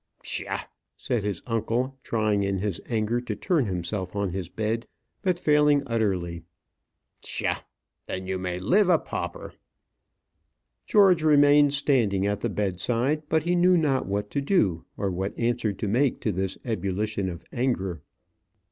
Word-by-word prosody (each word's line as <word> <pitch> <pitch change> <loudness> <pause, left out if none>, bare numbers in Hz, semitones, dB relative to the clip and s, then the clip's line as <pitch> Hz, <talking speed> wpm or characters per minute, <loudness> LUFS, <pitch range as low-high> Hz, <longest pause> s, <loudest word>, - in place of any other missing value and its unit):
"Psha!" - - -1 0.4
said 120 -5 -1
his 100 -4 -3
uncle, 120 +3 -1
trying 110 -4 0
in 100 0 0
his 95 -2 -2
anger 115 +1 0
to 115 -4 -4
turn 150 - +1
himself 90 +1 -3
on 100 -2 -1
his 90 -2 -4
bed, 110 +4 -2 0.3
but 185 -3 +1
failing 150 -3 +3
utterly. 95 -8 -1 0.8
"Psha! - - -1 0.5
Then 95 0 -4
you 95 0 -2
may 90 -1 -3
live 185 - +3
a 175 - +6
pauper." - - -6 1.3
George 195 -6 +5
remained 145 -1 +5
standing 115 -9 +2
at 100 0 -1
the - - 0
bedside; 115 - 0
but 160 -1 +2
he 175 +2 +1
knew 180 +1 +5
not 145 -5 +1
what 100 +1 -2
to 140 - -1
do, 105 - +1
or 100 -1 -1
what 95 +3 -3
answer 120 -2 0
to 100 +2 -4
make 125 +6 +1
to 110 - 0
this 95 0 -2
ebullition 100 -2 -1
of 85 -1 -7
anger. 95 - -1
110 Hz, 150 wpm, -26 LUFS, 95-140 Hz, 1.3 s, a